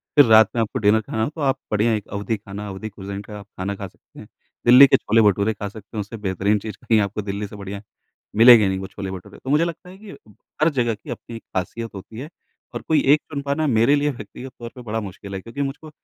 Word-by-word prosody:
फिर 145 -2 +8
रात 110 -2 +7
में 115 - +2
आपको 110 - -2
डिनर 105 +1 +3
खाना 110 +1 -3
हो - - 0
तो 155 +1 -9
आप 135 -2 +1
बढ़िया 110 +2 +2
एक 105 -2 -3
अवधी 105 +2 -3
खाना, 100 0 -8
अवधी 100 +3 -6
कुज़ीन 100 -1 -7
का 105 +1 -10
आप 100 - -12
खाना 100 +2 -2
खा 100 0 -6
सकते - - -19
हैं। - - -11 0.4
दिल्ली 125 +3 +9
के - - +5
छोले 115 +1 +2
भटूरे 105 +1 +3
खा 100 0 -5
सकते 110 +2 -11
हैं, - - 0
उससे 105 +3 -8
बेहतरीन 100 +1 0
चीज़ 105 -1 -7
कहीं 110 -2 +3
आपको 100 +1 -2
दिल्ली 100 0 -4
से 100 - -12
बढ़िया 100 0 -7 0.5
मिलेंगे 115 -1 +8
नहीं 95 0 -1
वो 95 - -6
छोले 95 -1 -6
भटूरे। 95 +2 -9
तो 130 - -6
मुझे 150 +3 +3
लगता 170 +1 -7
है 185 - -13
कि 205 0 -12 0.5
हर 155 - +5
जगह 120 -1 +1
की 105 - -15
अपनी 115 - -7
एक 115 - -9
ख़ासियत 115 +5 -5
होती 105 +4 -9
है 145 +4 -7 0.4
और - - -4
कोई 160 - +3
1 150 - +2
चुन 140 -2 -3
पाना 140 +2 -1
मेरे 115 +2 +4
लिए 145 0 +1
व्यक्तिगत 125 +2 -9
तौर 120 -1 -7
पे 125 - -9
बड़ा 110 -2 -3
मुश्किल 100 0 -9
है 95 - -5
क्योंकि 115 +7 -6
मुझको 140 +3 -4
110 Hz, 260 wpm, -22 LUFS, 100-125 Hz, 0.5 s, दिल्ली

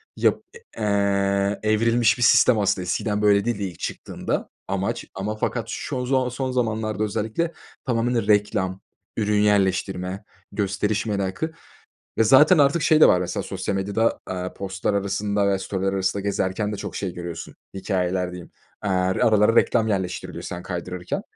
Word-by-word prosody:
yap - - +1
e 470 - -12 0.2
eee, 100 -1 +1
evrilmiş 115 +3 +3
bir 125 - 0
sistem 115 0 +5
aslında. 100 -2 +1
Eskiden 105 +4 -1
böyle 100 -1 +4
değildi 115 -4 -1
ilk 90 -4 -6
çıktığında. - - -4 0.2
Amaç - - -2
ama 100 +3 -3
fakat 110 - -2
şu 125 -1 -3
zon 130 -1 +1
son 130 +1 -3
zamanlarda 110 -3 -1
özellikle 110 +11 -2 0.3
tamamıyla 120 -2 0
reklam, 100 -3 +1 0.4
ürün 105 -1 +2
yerleştirme, 95 -1 0 0.3
gösteriş 105 +1 -1
merakı 100 +9 -2 0.7
ve 115 - +5
zaten 150 - +6
artık 145 +3 +3
şey 155 -1 +4
de - - +9
var 90 - +4
mesela 90 - -2
sosyal - - -3
medyada, 100 +4 0
aaa, 90 0 -4
post'lar 95 +1 -2
arasında 100 +1 0
ve 95 -1 +1
story'ler 95 0 -2
arasında 95 +1 0
gezerken 100 +1 -1
de - - -3
çok - - -6
şey 95 -3 -3
görüyorsun, 85 -1 -7 0.2
hikâyeler 90 -2 -1
diyeyim. 90 -1 -9 0.3
Aaa, 105 - -2
aralara 100 +4 +3
reklam 115 -2 +3
yerleştiriliyor 95 -3 -3
sen 90 0 -6
kaydırırken. 90 0 -4
100 Hz, 150 wpm, -23 LUFS, 95-110 Hz, 0.7 s, de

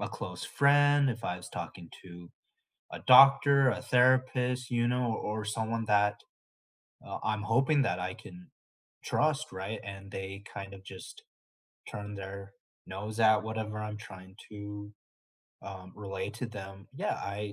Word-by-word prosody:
a - - -2
close - - -6
friend, 145 0 +4
if 115 -2 -3
I 90 - -1
was 90 - -10
talking 85 0 -7 0.2
to 85 -1 -12 0.6
a - - -6
doctor, 135 +1 +8
a 105 -4 -2
therapist, 125 0 +2
you 120 0 +2
know, 125 0 +1
o - - -5
or 105 0 -3
someone 110 +1 -2
that, 105 -1 +3 0.9
uh, - - -5
I'm 110 -1 -1
hoping 135 +7 +3
that 115 - 0
I 90 +1 -3
can 90 -1 -13 0.6
trust, 155 0 0
right, 95 +3 -5
and 100 0 -8
they 95 +1 -6
kind 100 0 -6
of 95 - -12
just 95 -1 -10 0.7
turn 105 0 -6
their 100 0 -7 0.4
nose 105 +4 -6
at 110 -1 +5
whatever 110 -1 -4
I'm 105 0 -4
trying 95 -2 -12
to, 105 0 -8 0.7
um, 95 -1 -9
relay 100 -1 -5
to 125 - -1
them. 95 -3 -9
Yeah, - - -1 0.2
I - - -6
105 Hz, 155 wpm, -30 LUFS, 95-125 Hz, 0.9 s, doctor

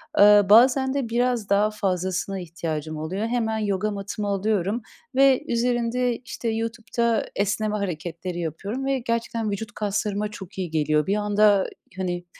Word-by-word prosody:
Aaa, 205 -3 +7
bazen 260 +4 +6
de 275 -5 -2
biraz 240 -2 0
daha 205 +2 +3
fazlasına 190 -1 -2
ihtiyacım 160 -3 -4
oluyor, 185 +8 -3
hemen 225 -2 0
yoga 210 -1 -1
matımı 205 +1 -4
alıyorum. 200 +2 0 0.3
Ve 270 -1 +5
üzerinde, 240 0 0
işte, 240 -1 -5
YouTube'da 230 +1 -1
esneme 210 +1 0
hareketleri 175 -1 -4
yapıyorum. 195 - -4
Ve 270 -1 +1
gerçekten 230 -2 -2
vücut 205 +1 -4
kaslarıma 210 0 -2
çok 195 -2 -10
iyi 185 -3 -3
geliyor. 150 -1 +1
Bir 200 - +2
anda, 210 0 +4
ııı, 190 - 0 0.3
hani, 175 -1 -3
210 Hz, 145 wpm, -24 LUFS, 190-230 Hz, 0.3 s, Aaa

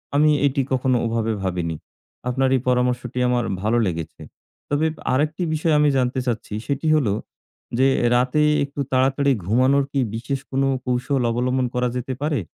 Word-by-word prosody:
আমি 150 +1 +5 0.2
এটি 140 0 0
কখনো 130 -1 +2
ওভাবে 115 -1 0
ভাবিনি। 90 -3 -2 0.5
আপনার 130 +1 +1
এই 130 - 0
পরামর্শটি 125 0 0
আমার 125 -1 +1 0.2
ভালো 110 +3 +1
লেগেছে। 85 -3 -5 0.5
তবে 145 +2 +1 0.3
আরেকটি 155 +6 0
বিষয় 155 +1 +1
আমি 150 0 +4
জানতে 130 0 0
চাচ্ছি। 115 -4 -3
সেটি 140 +3 -1
হলো 125 -10 +2 0.6
যে, 130 +2 +4 0.3
রাতে 125 +4 +2 0.2
একটু 140 0 -7
তাড়াতাড়ি 135 +2 +2
ঘুমানোর 130 +7 +3
কি 140 - 0 0.2
বিশেষ 125 +4 -3
কোনো 135 0 +1 0.2
কৌশল 125 +2 0
অবলম্বন 125 +2 0
করা 125 0 +1
যেতে 125 +1 -3
পারে? 150 -2 0
130 Hz, 155 wpm, -22 LUFS, 120-140 Hz, 0.6 s, আমি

